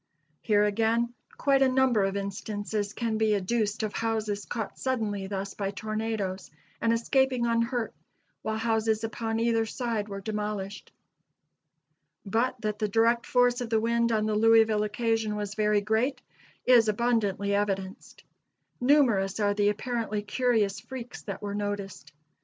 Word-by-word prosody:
Here, 210 Hz, -2 st, +3 dB
again, 225 Hz, +3 st, +1 dB, 0.2 s
quite 275 Hz, -1 st, +3 dB
a 265 Hz, -, +5 dB
number 255 Hz, -5 st, +3 dB
of 195 Hz, +1 st, -1 dB
instances 205 Hz, +1 st, -3 dB
can 225 Hz, -2 st, -2 dB
be 215 Hz, -1 st, +3 dB
adduced 210 Hz, +2 st, -1 dB
of 215 Hz, -, -2 dB
houses 215 Hz, -3 st, -2 dB
caught 225 Hz, -4 st, -5 dB
suddenly 215 Hz, -7 st, -1 dB
thus 195 Hz, 0 st, -4 dB
by 195 Hz, -1 st, -3 dB
tornadoes 215 Hz, -2 st, -3 dB, 0.3 s
and 230 Hz, -, +2 dB
escaping 255 Hz, +1 st, +2 dB
unhurt, 230 Hz, 0 st, 0 dB, 0.5 s
while 220 Hz, 0 st, -2 dB
houses 220 Hz, -1 st, 0 dB
upon 225 Hz, 0 st, -2 dB
either 225 Hz, -1 st, +1 dB
side 225 Hz, -3 st, -3 dB
were 200 Hz, 0 st, -5 dB
demolished. 210 Hz, -1 st, -4 dB, 1.3 s
But 235 Hz, +5 st, 0 dB
that 210 Hz, -1 st, -2 dB
the 215 Hz, -, +1 dB
direct 230 Hz, +3 st, +2 dB
force 245 Hz, 0 st, +3 dB
of 240 Hz, -, -4 dB
the 225 Hz, -1 st, +2 dB
wind 235 Hz, +1 st, +1 dB
on 215 Hz, -1 st, +1 dB
the 215 Hz, -, 0 dB
Louisville 220 Hz, 0 st, +4 dB
occasion 220 Hz, 0 st, 0 dB
was 205 Hz, -1 st, -4 dB
very 210 Hz, -1 st, +2 dB
great 225 Hz, +6 st, 0 dB, 0.5 s
is 240 Hz, -3 st, +6 dB
abundantly 210 Hz, -3 st, +1 dB
evidenced. 195 Hz, -2 st, -3 dB, 0.6 s
Numerous 240 Hz, -8 st, +3 dB
are 205 Hz, -1 st, +2 dB
the 205 Hz, 0 st, +2 dB
apparently 215 Hz, -1 st, -2 dB
curious 215 Hz, -2 st, +1 dB
freaks 250 Hz, -2 st, -8 dB
that 200 Hz, 0 st, -7 dB
were 200 Hz, -1 st, -3 dB
noticed. 205 Hz, -7 st, -4 dB
220 Hz, 145 wpm, -28 LUFS, 205-235 Hz, 1.3 s, is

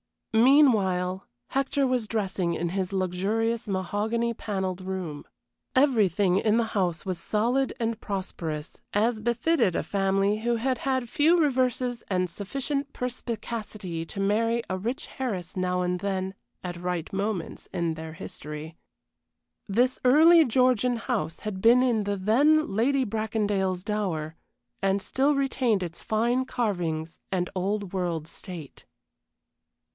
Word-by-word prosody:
Meanwhile, 215 Hz, -8 st, +4 dB, 0.2 s
Hector 275 Hz, +1 st, +1 dB
was 250 Hz, -4 st, 0 dB
dressing 195 Hz, -5 st, -1 dB
in 170 Hz, +1 st, -1 dB
his 190 Hz, +1 st, -2 dB
luxurious 205 Hz, +5 st, 0 dB
mahogany 210 Hz, +5 st, -1 dB
panelled 190 Hz, -4 st, -3 dB
room. 185 Hz, -6 st, -5 dB, 0.5 s
Everything 205 Hz, -, +3 dB
in 215 Hz, +1 st, +2 dB
the 235 Hz, -, +3 dB
house 180 Hz, -4 st, 0 dB
was 185 Hz, -3 st, -2 dB
solid 240 Hz, +9 st, +1 dB
and 230 Hz, -1 st, -1 dB
prosperous, 165 Hz, -7 st, -5 dB
as 220 Hz, +2 st, +2 dB
befitted 235 Hz, -, +1 dB
a -, -, 0 dB
family 195 Hz, +3 st, +1 dB
who 235 Hz, +2 st, +1 dB
had 255 Hz, +2 st, 0 dB
had 260 Hz, -3 st, -1 dB
few 320 Hz, +8 st, +4 dB
reverses 255 Hz, -4 st, +1 dB
and 180 Hz, -2 st, 0 dB
sufficient 275 Hz, -, -3 dB
perspicacity 220 Hz, -7 st, -4 dB
to 195 Hz, -, -8 dB
marry 230 Hz, +4 st, +1 dB
a 185 Hz, -, -1 dB
rich 235 Hz, +9 st, -4 dB
heiress 190 Hz, -9 st, -3 dB
now 180 Hz, 0 st, 0 dB
and 180 Hz, 0 st, 0 dB
then 190 Hz, -1 st, -2 dB, 0.3 s
at 175 Hz, -1 st, -5 dB
right 180 Hz, -2 st, -3 dB
moments 195 Hz, -3 st, -3 dB
in 170 Hz, -3 st, 0 dB
their 160 Hz, 0 st, -7 dB
history. 160 Hz, -3 st, -7 dB, 0.9 s
This 245 Hz, +5 st, +2 dB
early 320 Hz, +5 st, +7 dB
Georgian 250 Hz, 0 st, +3 dB
house 230 Hz, -8 st, -3 dB
had 200 Hz, -3 st, -4 dB
been 240 Hz, +4 st, +6 dB
in 230 Hz, -5 st, +1 dB
the 200 Hz, 0 st, -1 dB
then 275 Hz, +8 st, +3 dB
Lady 265 Hz, +6 st, +2 dB
Bracondale's 205 Hz, -4 st, -1 dB
dower, 180 Hz, -7 st, -2 dB, 0.5 s
and 195 Hz, 0 st, +2 dB
still 275 Hz, +8 st, +1 dB
retained 255 Hz, -7 st, +1 dB
its 170 Hz, -1 st, -6 dB
fine 240 Hz, +4 st, +1 dB
carvings 170 Hz, -10 st, -2 dB
and 180 Hz, -2 st, 0 dB
Old 195 Hz, +1 st, -2 dB
World 170 Hz, -4 st, -2 dB
state. 165 Hz, -7 st, -10 dB
205 Hz, 130 wpm, -27 LUFS, 185-240 Hz, 0.9 s, early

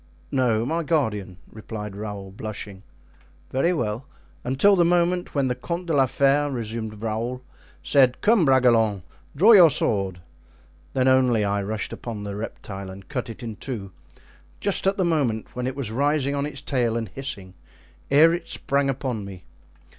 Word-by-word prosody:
"No, 120 Hz, -4 st, +1 dB
my 165 Hz, +5 st, -1 dB
guardian," 110 Hz, -, -1 dB
replied 105 Hz, -2 st, -7 dB
Raoul, 100 Hz, -2 st, -6 dB
blushing. 100 Hz, -1 st, -7 dB, 0.7 s
"Very 135 Hz, +7 st, +2 dB
well——" 120 Hz, -6 st, -2 dB, 0.4 s
"Until 135 Hz, +11 st, +4 dB
the 175 Hz, -, +4 dB
moment 175 Hz, 0 st, +1 dB
when 140 Hz, -2 st, +2 dB
the 125 Hz, -, 0 dB
Comte 170 Hz, +8 st, -5 dB
de 165 Hz, -, -2 dB
la 135 Hz, -2 st, +4 dB
Fere," 140 Hz, +3 st, +2 dB
resumed 110 Hz, -4 st, -5 dB
Raoul, 115 Hz, +3 st, -3 dB, 0.4 s
"said, 130 Hz, -3 st, +4 dB
'Come, 215 Hz, -3 st, +4 dB
Bragelonne, 120 Hz, -, +3 dB, 0.3 s
draw 200 Hz, +11 st, +6 dB
your 180 Hz, -7 st, +9 dB
sword;' 95 Hz, -9 st, 0 dB, 0.7 s
then 130 Hz, -1 st, +2 dB
only 125 Hz, -5 st, +3 dB
I 100 Hz, 0 st, 0 dB
rushed 105 Hz, +2 st, -4 dB
upon 110 Hz, -4 st, -6 dB
the 100 Hz, -1 st, -5 dB
reptile 100 Hz, -2 st, -7 dB
and 95 Hz, 0 st, -11 dB
cut 125 Hz, -5 st, -3 dB
it 115 Hz, +2 st, -8 dB
in 110 Hz, -3 st, -6 dB
two, 105 Hz, -7 st, -6 dB, 0.7 s
just 195 Hz, -1 st, 0 dB
at 195 Hz, -, +2 dB
the 190 Hz, -, +1 dB
moment 135 Hz, -10 st, -1 dB
when 125 Hz, 0 st, -2 dB
it 130 Hz, -, -3 dB
was 130 Hz, -6 st, -4 dB
rising 140 Hz, +2 st, +1 dB
on 140 Hz, 0 st, -1 dB
its 140 Hz, -3 st, -6 dB
tail 120 Hz, -4 st, 0 dB
and 115 Hz, -1 st, -3 dB
hissing, 100 Hz, -7 st, -6 dB, 0.6 s
ere 155 Hz, +4 st, +6 dB
it 175 Hz, -, -4 dB
sprang 140 Hz, 0 st, 0 dB
upon 130 Hz, -5 st, -3 dB
me. 95 Hz, -3 st, -10 dB
125 Hz, 165 wpm, -24 LUFS, 105-145 Hz, 0.7 s, your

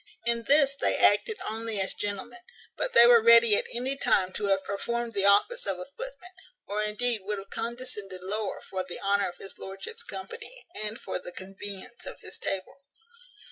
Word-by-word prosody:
In 235 Hz, -1 st, 0 dB
this 280 Hz, -1 st, +4 dB
they -, -, +1 dB
acted 445 Hz, -3 st, +3 dB
only 225 Hz, -1 st, -2 dB
as 190 Hz, -, +1 dB
gentlemen; 205 Hz, +4 st, -4 dB, 0.4 s
but -, -, -2 dB
they 235 Hz, -, +9 dB
were 240 Hz, -1 st, +7 dB
ready 230 Hz, -1 st, +8 dB
at -, -, +1 dB
any 255 Hz, +3 st, +1 dB
time 195 Hz, -8 st, +2 dB
to 210 Hz, -, -2 dB
have 195 Hz, -1 st, +2 dB
performed 235 Hz, +4 st, -3 dB
the 200 Hz, -1 st, +1 dB
office 485 Hz, -, +3 dB
of -, -, 0 dB
a -, -, -5 dB
footman, -, -, -8 dB, 0.3 s
or 210 Hz, +1 st, -2 dB
indeed 215 Hz, +1 st, 0 dB
would 205 Hz, +2 st, -3 dB
have 195 Hz, 0 st, -10 dB
condescended 225 Hz, -5 st, -4 dB
lower, 205 Hz, +2 st, -3 dB
for 185 Hz, -1 st, -3 dB
the 180 Hz, -1 st, -7 dB
honour 200 Hz, 0 st, +1 dB
of 175 Hz, -, -12 dB
his 195 Hz, -, -9 dB
lordship's 195 Hz, 0 st, -6 dB
company, 195 Hz, -, -8 dB
and 215 Hz, +1 st, -3 dB
for -, -, -4 dB
the 175 Hz, -, -5 dB
convenience 195 Hz, -, -7 dB
of -, -, -8 dB
his -, -, -5 dB
table. 190 Hz, -1 st, -4 dB
215 Hz, 185 wpm, -28 LUFS, 195-240 Hz, 0.4 s, they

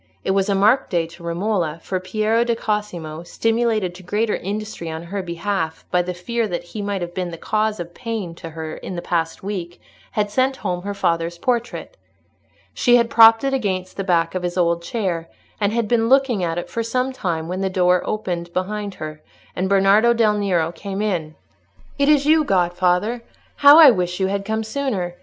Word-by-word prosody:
It -, -, 0 dB
was 195 Hz, +1 st, +1 dB
a 200 Hz, -, +2 dB
marked 215 Hz, +7 st, +3 dB
day 170 Hz, -3 st, +1 dB
to 170 Hz, +2 st, -14 dB
Romola, 170 Hz, -1 st, -1 dB
for 185 Hz, -, -2 dB
Piero 215 Hz, +5 st, +1 dB
di 235 Hz, -1 st, 0 dB
Cosimo, 180 Hz, -8 st, -3 dB
stimulated 225 Hz, 0 st, 0 dB
to 180 Hz, -, -12 dB
greater 210 Hz, +4 st, 0 dB
industry 205 Hz, -3 st, -5 dB
on 160 Hz, +1 st, -5 dB
her 195 Hz, +3 st, -4 dB
behalf 170 Hz, -2 st, -3 dB
by 180 Hz, -, +3 dB
the 180 Hz, 0 st, -4 dB
fear 230 Hz, +5 st, -2 dB
that 175 Hz, -3 st, -4 dB
he 205 Hz, +5 st, -7 dB
might 200 Hz, -2 st, -2 dB
have 175 Hz, 0 st, -6 dB
been 180 Hz, -1 st, -3 dB
the 165 Hz, -, -7 dB
cause 215 Hz, +4 st, -1 dB
of 175 Hz, 0 st, -6 dB
pain 225 Hz, -7 st, -5 dB
to 165 Hz, 0 st, -9 dB
her 160 Hz, 0 st, -6 dB
in 185 Hz, -, -7 dB
the 175 Hz, -, -5 dB
past 165 Hz, 0 st, -2 dB
week, 180 Hz, -4 st, -5 dB, 0.3 s
had 205 Hz, -1 st, 0 dB
sent 260 Hz, +4 st, +1 dB
home 180 Hz, -2 st, -1 dB
her 200 Hz, +2 st, -5 dB
father's 170 Hz, -1 st, -1 dB
portrait. 240 Hz, -, -2 dB, 0.8 s
She 245 Hz, -1 st, +4 dB
had 235 Hz, -1 st, +2 dB
propped 225 Hz, +1 st, +7 dB
it 270 Hz, 0 st, 0 dB
against 190 Hz, -7 st, -2 dB
the 195 Hz, -, -3 dB
back 170 Hz, -3 st, +1 dB
of 185 Hz, -, -2 dB
his 175 Hz, 0 st, -3 dB
old 170 Hz, -1 st, +2 dB
chair, 170 Hz, -4 st, -3 dB, 0.3 s
and 205 Hz, -1 st, +1 dB
had 230 Hz, -1 st, 0 dB
been 230 Hz, 0 st, +2 dB
looking 260 Hz, -7 st, +3 dB
at 165 Hz, -1 st, -1 dB
it 175 Hz, -, -3 dB
for 230 Hz, -, -3 dB
some 250 Hz, +3 st, -1 dB
time, 165 Hz, -9 st, -3 dB
when 185 Hz, +2 st, -3 dB
the 190 Hz, -, 0 dB
door 180 Hz, -1 st, +3 dB
opened 175 Hz, -5 st, -3 dB
behind 200 Hz, +2 st, -3 dB
her, 155 Hz, 0 st, -7 dB, 0.3 s
and 185 Hz, +1 st, -1 dB
Bernardo 200 Hz, +4 st, +5 dB
del 220 Hz, -2 st, +3 dB
Nero 180 Hz, -6 st, 0 dB
came 195 Hz, +4 st, -5 dB
in. 165 Hz, -7 st, -2 dB, 0.6 s
"It 280 Hz, +1 st, +3 dB
is 290 Hz, -2 st, +4 dB
you, 310 Hz, +1 st, +5 dB
godfather! 185 Hz, +2 st, +1 dB, 0.4 s
How 285 Hz, +1 st, +8 dB
I 310 Hz, -5 st, +10 dB
wish 180 Hz, -3 st, -2 dB
you 190 Hz, -, +2 dB
had 200 Hz, +1 st, -2 dB
come 220 Hz, +1 st, -1 dB
sooner! 220 Hz, -7 st, -2 dB
195 Hz, 200 wpm, -21 LUFS, 175-220 Hz, 0.8 s, I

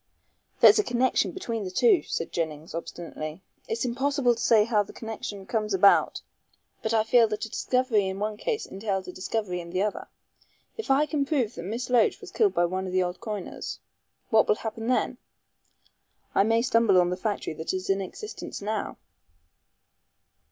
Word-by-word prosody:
"There's -, -, +8 dB
a -, -, +3 dB
connection 245 Hz, -2 st, +1 dB
between 230 Hz, -, -4 dB
the 185 Hz, -, -4 dB
two," 375 Hz, -, +4 dB
said 165 Hz, -, -3 dB
Jennings, 160 Hz, -1 st, -4 dB
obstinately; 165 Hz, 0 st, -6 dB, 0.2 s
"it's 230 Hz, +2 st, -2 dB
impossible 265 Hz, +1 st, +1 dB
to 230 Hz, -, -7 dB
say 225 Hz, -2 st, +5 dB
how 215 Hz, -1 st, +2 dB
the 205 Hz, -, -7 dB
connection 215 Hz, -3 st, -6 dB
comes 215 Hz, -1 st, -1 dB
about, 200 Hz, +1 st, +4 dB, 0.6 s
but 220 Hz, -, -2 dB
I 220 Hz, -1 st, +3 dB
feel 230 Hz, +1 st, +5 dB
that 215 Hz, 0 st, -3 dB
a -, -, -9 dB
discovery 245 Hz, -5 st, +1 dB
in 190 Hz, 0 st, -3 dB
one 210 Hz, +1 st, -2 dB
case 440 Hz, -, -2 dB
entails 195 Hz, -1 st, -3 dB
a -, -, -5 dB
discovery 185 Hz, -1 st, -3 dB
in 170 Hz, -, -10 dB
the 185 Hz, +3 st, 0 dB
other. 210 Hz, -, -3 dB, 0.7 s
If 445 Hz, -, -6 dB
I 275 Hz, +3 st, +4 dB
can 290 Hz, -1 st, 0 dB
prove 270 Hz, -6 st, 0 dB
that -, -, -7 dB
Miss 230 Hz, +6 st, -3 dB
Loach 240 Hz, -3 st, +3 dB
was -, -, -11 dB
killed 415 Hz, -3 st, +2 dB
by 175 Hz, -, +3 dB
one 185 Hz, +2 st, -2 dB
of 185 Hz, -, -5 dB
the 185 Hz, 0 st, +3 dB
old 180 Hz, 0 st, -4 dB
coiners 210 Hz, -5 st, -5 dB, 0.3 s
" -, -, -48 dB
"What 220 Hz, -1 st, +5 dB
will -, -, +4 dB
happen 225 Hz, +1 st, -5 dB
then?" 250 Hz, 0 st, 0 dB, 1.1 s
"I -, -, +4 dB
may 225 Hz, +1 st, +2 dB
stumble 230 Hz, -6 st, +4 dB
on 175 Hz, 0 st, +2 dB
the -, -, 0 dB
factory 205 Hz, -2 st, -3 dB
that 160 Hz, +1 st, -4 dB
is 185 Hz, 0 st, -3 dB
in 195 Hz, 0 st, +1 dB
existence 420 Hz, -, -7 dB
now." 210 Hz, 0 st, -3 dB
215 Hz, 185 wpm, -27 LUFS, 190-240 Hz, 1.1 s, There's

